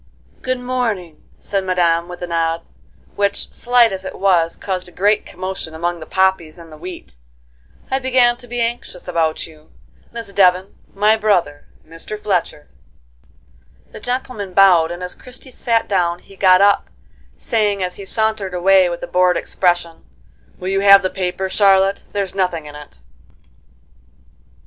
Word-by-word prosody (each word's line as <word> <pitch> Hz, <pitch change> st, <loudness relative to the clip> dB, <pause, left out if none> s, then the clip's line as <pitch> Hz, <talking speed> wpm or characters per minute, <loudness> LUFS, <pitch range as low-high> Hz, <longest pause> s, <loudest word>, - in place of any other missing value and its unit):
"Good 255 Hz, 0 st, -2 dB
morning," 230 Hz, -10 st, -3 dB, 0.2 s
said 195 Hz, -1 st, -3 dB
Madame 175 Hz, -2 st, +1 dB
with 180 Hz, 0 st, -9 dB
a -, -, -1 dB
nod, 165 Hz, 0 st, -1 dB, 0.5 s
which, 200 Hz, 0 st, -1 dB
slight 240 Hz, -3 st, +3 dB
as 190 Hz, 0 st, -5 dB
it -, -, -7 dB
was, 175 Hz, -4 st, +2 dB
caused 185 Hz, -2 st, -4 dB
a -, -, -14 dB
great 205 Hz, +4 st, +1 dB
commotion 185 Hz, -3 st, -6 dB
among 170 Hz, +1 st, -2 dB
the 155 Hz, -, -10 dB
poppies 190 Hz, -4 st, 0 dB
and 165 Hz, -1 st, -13 dB
the 155 Hz, -, -11 dB
wheat; 180 Hz, +2 st, -9 dB, 0.8 s
"I 265 Hz, -, +1 dB
began 255 Hz, -2 st, +3 dB
to 245 Hz, -, -12 dB
be 245 Hz, 0 st, -3 dB
anxious 230 Hz, -6 st, -4 dB
about 165 Hz, -3 st, -1 dB
you. 155 Hz, -1 st, -18 dB, 0.4 s
Miss 230 Hz, -4 st, -7 dB
Devon, 185 Hz, 0 st, +3 dB, 0.2 s
my 210 Hz, +2 st, +4 dB
brother, 180 Hz, -9 st, 0 dB, 0.2 s
Mr. 165 Hz, +6 st, -7 dB
Fletcher." 180 Hz, -7 st, -2 dB, 1.2 s
The -, -, -10 dB
gentleman 245 Hz, -6 st, -4 dB
bowed, 180 Hz, -5 st, +6 dB
and 175 Hz, +1 st, -6 dB
as 180 Hz, -, -4 dB
Christie 255 Hz, +1 st, -12 dB
sat 230 Hz, -2 st, 0 dB
down 175 Hz, -3 st, 0 dB
he 195 Hz, -, -18 dB
got 185 Hz, -1 st, +5 dB
up, 200 Hz, 0 st, +3 dB, 0.5 s
saying, 205 Hz, -4 st, 0 dB
as 180 Hz, 0 st, -4 dB
he 200 Hz, -, -8 dB
sauntered 220 Hz, -3 st, -1 dB
away 185 Hz, 0 st, +4 dB
with 170 Hz, -, -6 dB
a -, -, -4 dB
bored 180 Hz, -1 st, +2 dB
expression: 175 Hz, -2 st, -1 dB, 0.5 s
"Will 185 Hz, -, -5 dB
you 195 Hz, 0 st, +1 dB
have 200 Hz, 0 st, +7 dB
the 185 Hz, -, -1 dB
paper, 190 Hz, 0 st, -2 dB
Charlotte? 195 Hz, 0 st, +3 dB
There's 200 Hz, -2 st, -3 dB
nothing 180 Hz, -5 st, -1 dB
in 150 Hz, -, -10 dB
it." 150 Hz, -, -12 dB
190 Hz, 160 wpm, -18 LUFS, 175-205 Hz, 1.2 s, have